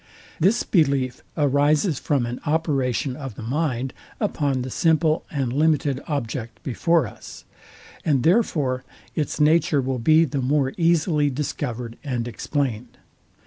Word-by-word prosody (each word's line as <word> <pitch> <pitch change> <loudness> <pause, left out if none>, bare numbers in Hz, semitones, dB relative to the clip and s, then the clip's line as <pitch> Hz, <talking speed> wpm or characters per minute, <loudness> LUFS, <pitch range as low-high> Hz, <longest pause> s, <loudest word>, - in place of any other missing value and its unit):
This 200 +9 +3
belief 135 - +1 0.2
arises 145 +2 +2
from 140 -5 0
an 120 +1 -5
operation 140 -5 0
of 135 -5 -7
the - - -8
mind 130 0 -1 0.3
upon 145 - 0
the 130 - -6
simple 160 0 +2
and 135 -5 -2
limited 145 -2 +1
object 120 -5 -4
before 165 +4 +2
us; 105 - -11 0.6
and 140 -6 +2
therefore 150 - +2 0.3
its 150 -2 -2
nature 155 -1 +4
will 130 -1 -1
be 155 +7 +5
the 140 -3 -2
more 135 +1 +1
easily 165 -3 +2
discovered 125 -4 -4
and 125 -4 -2
explained. 125 -2 -3
140 Hz, 130 wpm, -23 LUFS, 125-155 Hz, 0.6 s, be